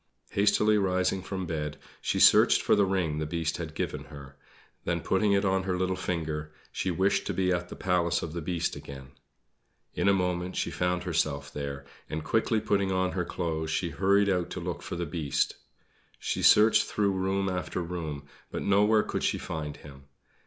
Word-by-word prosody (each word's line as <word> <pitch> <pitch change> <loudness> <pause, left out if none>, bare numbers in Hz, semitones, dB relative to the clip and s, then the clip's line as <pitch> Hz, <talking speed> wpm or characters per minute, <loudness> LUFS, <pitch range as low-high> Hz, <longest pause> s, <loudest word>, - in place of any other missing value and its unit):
Hastily 105 +1 +3
rising 95 -1 +1
from 95 0 -4
bed, 75 -3 -3 0.2
she - - -1
searched - - +6
for - - +4
the 100 -1 +3
ring 90 -6 0
the 75 - -2
Beast 80 -1 -2
had 80 -2 -6
given - - -3
her. 70 -1 -11 0.5
Then 85 -1 -1
putting 100 +4 +2
it 100 0 +2
on 95 -1 +2
her 95 -1 -1
little 95 0 0
finger 80 -4 -3 0.2
she 95 - -2
wished 95 +3 +1
to - - -2
be 90 -1 +1
at 90 -1 -1
the - - -7
Palace 90 -2 +1
of 80 - -5
the 85 - -4
Beast 85 +1 -2
again. 65 -1 -10 0.8
In - - +2
a - - +6
moment 90 -1 -1
she - - -1
found 90 0 -1
herself 70 -5 -1
there; 70 -1 -5 0.2
and 80 0 -3
quickly 110 0 +1
putting 100 -2 0
on 95 0 +1
her 90 - -1
clothes 80 -3 -3
she 80 +2 -1
hurried 100 +2 +3
out 90 -3 0
to - - -5
look 85 0 -4
for 90 - -6
the 85 0 -2
Beast. 75 -3 -1 0.6
She - - -2
searched 110 +1 +6
through 100 -2 +1
room 95 +1 0
after 90 0 -2
room; 80 -5 -5 0.2
but - - -4
nowhere 105 +2 +4
could - - -3
she - - +1
find 75 -2 -5
him. 70 -2 -13
90 Hz, 190 wpm, -28 LUFS, 80-95 Hz, 0.8 s, searched